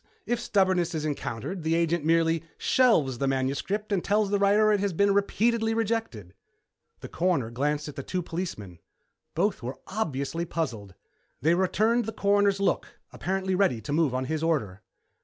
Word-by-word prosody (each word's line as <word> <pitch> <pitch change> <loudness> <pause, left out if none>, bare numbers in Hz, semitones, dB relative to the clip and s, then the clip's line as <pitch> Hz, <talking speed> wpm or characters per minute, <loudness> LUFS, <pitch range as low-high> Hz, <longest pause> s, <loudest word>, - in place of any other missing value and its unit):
If 240 -1 -1
stubbornness 185 -6 +1
is 155 -1 -2
encountered, 150 - -4
the 160 +1 0
agent 170 -1 +1
merely 165 0 +2
shelves 155 - +3
the 140 - 0
manuscript 140 +11 -1
and 195 -3 +1
tells 205 -1 +1
the 205 - +2
writer 205 +2 +4
it 205 - +2
has 200 -1 -1
been 200 +4 +3
repeatedly 225 +3 +1
rejected." 220 - -2 0.7
The - - -7
Coroner 165 -10 0
glanced 145 +5 -1
at 150 - -8
the - - -4
two 180 +6 -3
policemen. 135 - -6 0.6
Both 200 +5 0
were 125 +3 -5
obviously 165 -6 -2
puzzled. 115 - -4 0.5
They 160 +3 +4
returned 215 +6 +2
the 225 - -5
Coroner's 200 -1 +2
look, 200 - -1 0.2
apparently 190 +1 -2
ready 185 - +2
to 145 - -4
move 150 -5 +2
on 130 0 -1
his 155 +3 -2
order. 110 - -1
170 Hz, 165 wpm, -27 LUFS, 140-200 Hz, 0.7 s, writer